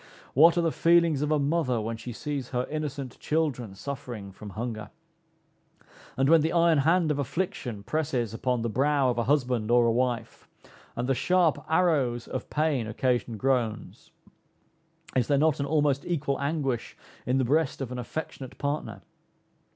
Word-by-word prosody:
What 165 Hz, +5 st, +6 dB
are -, -, +4 dB
the 165 Hz, -, +2 dB
feelings 165 Hz, -4 st, +3 dB
of 150 Hz, -, 0 dB
a 155 Hz, -, +3 dB
mother 140 Hz, -4 st, +1 dB
when 115 Hz, +1 st, -3 dB
she 120 Hz, +2 st, -7 dB
sees 140 Hz, +1 st, -4 dB
her 125 Hz, -1 st, -1 dB
innocent 145 Hz, -4 st, -4 dB
children 135 Hz, -10 st, -1 dB
suffering 120 Hz, -4 st, -6 dB
from 105 Hz, +2 st, -10 dB
hunger! 110 Hz, 0 st, -5 dB, 1.3 s
And 135 Hz, +1 st, +3 dB
when 165 Hz, +1 st, +6 dB
the 160 Hz, +2 st, 0 dB
iron 170 Hz, -3 st, +4 dB
hand 165 Hz, +2 st, +3 dB
of 145 Hz, -, -1 dB
affliction 125 Hz, -, -3 dB
presses 130 Hz, -6 st, -1 dB
upon 125 Hz, 0 st, -1 dB
the -, -, 0 dB
brow 135 Hz, +2 st, +2 dB
of 120 Hz, -, -2 dB
a 120 Hz, -, 0 dB
husband 125 Hz, -6 st, +1 dB
or 120 Hz, 0 st, +5 dB
a 115 Hz, -, +3 dB
wife, 120 Hz, 0 st, -2 dB, 0.5 s
and 120 Hz, +1 st, -2 dB
the 135 Hz, -, +3 dB
sharp 165 Hz, 0 st, +2 dB
arrows 145 Hz, -9 st, +2 dB
of -, -, -5 dB
pain 150 Hz, -7 st, 0 dB
occasion 120 Hz, -1 st, -1 dB
groans, 125 Hz, -3 st, -1 dB, 1.1 s
is 125 Hz, -3 st, +2 dB
there 140 Hz, -, +3 dB
not 155 Hz, +1 st, +2 dB
an 140 Hz, -, -1 dB
almost 145 Hz, -2 st, +1 dB
equal 145 Hz, -5 st, -2 dB
anguish 140 Hz, -5 st, -2 dB, 0.3 s
is 125 Hz, +2 st, +2 dB
the 130 Hz, -, +2 dB
breast 150 Hz, +3 st, +1 dB
of 130 Hz, -3 st, -4 dB
an 125 Hz, -, -4 dB
affectionate 130 Hz, 0 st, -6 dB
partner? 145 Hz, +2 st, -3 dB
135 Hz, 165 wpm, -27 LUFS, 120-155 Hz, 1.3 s, What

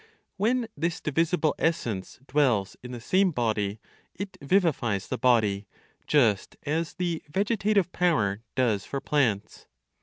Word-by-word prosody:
When 230 Hz, +4 st, +1 dB
this 165 Hz, +3 st, -1 dB
divisible 160 Hz, +1 st, +1 dB
essence 115 Hz, -, -1 dB
dwells 125 Hz, -9 st, +1 dB
in 125 Hz, -, -8 dB
the 120 Hz, -, -6 dB
same 185 Hz, +10 st, +3 dB
body, 110 Hz, -, -1 dB, 0.4 s
it 195 Hz, +1 st, -6 dB
vivifies 140 Hz, -, +1 dB
the 130 Hz, -, -2 dB
body, 110 Hz, -6 st, +2 dB, 0.4 s
just 115 Hz, -9 st, +2 dB
as 160 Hz, +3 st, -2 dB
the 175 Hz, -3 st, -2 dB
vegetative 200 Hz, +1 st, +1 dB
power 115 Hz, -, +1 dB
does 115 Hz, -6 st, +1 dB
for 140 Hz, -, -4 dB
plants. 125 Hz, -10 st, -1 dB
145 Hz, 125 wpm, -27 LUFS, 110-175 Hz, 0.4 s, same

